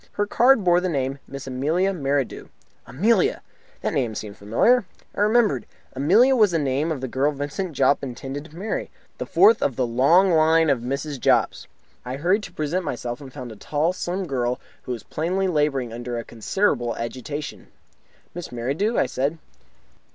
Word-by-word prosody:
Her 205 - 0
card 240 +2 +4
bore 175 -1 +4
the 185 - -1
name 135 -3 -2
"Miss 135 0 -8
Amelia 155 +9 0
Merridew." 140 -5 -2 0.4
Amelia! 230 - +2 0.4
The - - 0
name 125 -8 -1
seemed 105 -1 -6
familiar. 115 - +3 0.3
Then - - -8
I - - +2
remembered. 210 - +2 0.3
Amelia 205 - +4
was 215 -4 +5
the 170 - 0
name 145 +2 0
of 145 -5 -3
the 130 - -3
girl 135 +4 +1
Vincent 145 +5 -4
Jopp 140 - +3
intended 135 +2 -6
to 160 - -15
marry, 200 +6 -3 0.3
the - - -4
fourth 225 0 +5
of 135 - 0
the 130 - +1
long 140 +11 +4
line 160 -1 +4
of 135 - +1
Mrs. 140 +3 -4
Jopps. - - +1 0.4
I 125 +1 -5
hurried 180 +9 +1
to 190 - -9
present 170 +3 -2
myself, 120 -4 -4
and 135 -2 -10
found 125 -3 -8
a - - -9
tall, 150 - -1
slim 185 +1 -3
girl, 125 -5 -1 0.3
who - - -4
was 120 -3 -5
plainly 185 +5 -1
labouring 145 -8 0
under 120 0 -5
a 115 - -4
considerable 120 - -1
agitation. 130 +5 -6 0.7
"Miss 175 -1 -7
Merridew?" 140 - -1
I - - +3
said. 140 +5 -2
145 Hz, 180 wpm, -23 LUFS, 130-180 Hz, 0.7 s, was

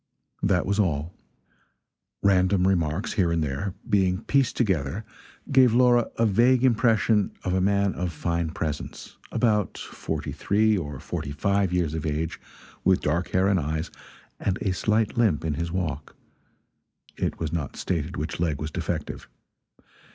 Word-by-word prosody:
That 95 -3 +2
was 100 +2 0
all. 85 -3 0 1.1
Random 95 -1 +3
remarks 85 +1 0
here 90 -6 +2
and 85 -1 +1
there, 75 +7 -3
being 95 -3 +2
pieced 135 -4 +1
together 95 - 0 0.5
gave 130 -4 +5
Laura 120 -1 +4
a 115 - +3
vague 120 +5 +4
impression 115 -4 +3
of 90 - -1
a 95 - +2
man 100 0 +2
of 90 -1 -3
fine 85 0 -2
presence, 75 -2 -5
about 105 -4 +1
forty - - -5
three 110 +2 +2
or 75 -8 -4
forty 80 -4 -5
five 100 +5 +1
years 85 -4 0
of 80 -1 -3
age, 75 +2 -2 0.4
with 95 -1 +3
dark 85 +4 0
hair 95 +1 +2
and 100 -2 +3
eyes, 80 +2 -3 0.5
and 95 0 -1
a 95 - +1
slight 110 +4 0
limp 100 -10 +2
in 80 - 0
his 85 +3 -3
walk 85 -5 -3 1.0
it - - -2
was 80 -1 -3
not 80 -4 -3
stated 85 0 -2
which 80 +3 -4
leg 80 -5 0
was 75 0 -4
defective. 85 -3 -4
90 Hz, 150 wpm, -25 LUFS, 80-105 Hz, 1.1 s, gave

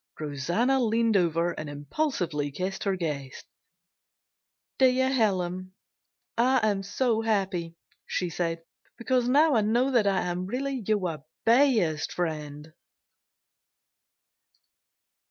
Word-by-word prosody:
Rosanna 170 - 0
leaned 225 -1 +2
over 170 -2 +2
and 155 -3 -6
impulsively 150 - -2
kissed 185 +8 -4
her 195 -1 +1
guest. 145 -7 -5 1.3
"Dear 260 0 +3
Helen, 185 -5 0 0.6
I 245 -1 +3
am 200 -2 0
so 225 +3 0
happy," 190 -6 -1 0.3
she 180 - -1
said, 165 -1 -2 0.3
"because 245 0 0
now 300 +3 +5
I 225 - +4
know 240 +6 +2
that 235 -5 +3
I 195 -1 +2
am 180 +1 -3
really 260 +2 -3
your 180 -9 -1 0.2
best 225 - +3
friend." 155 -2 -4
195 Hz, 105 wpm, -27 LUFS, 165-240 Hz, 1.3 s, now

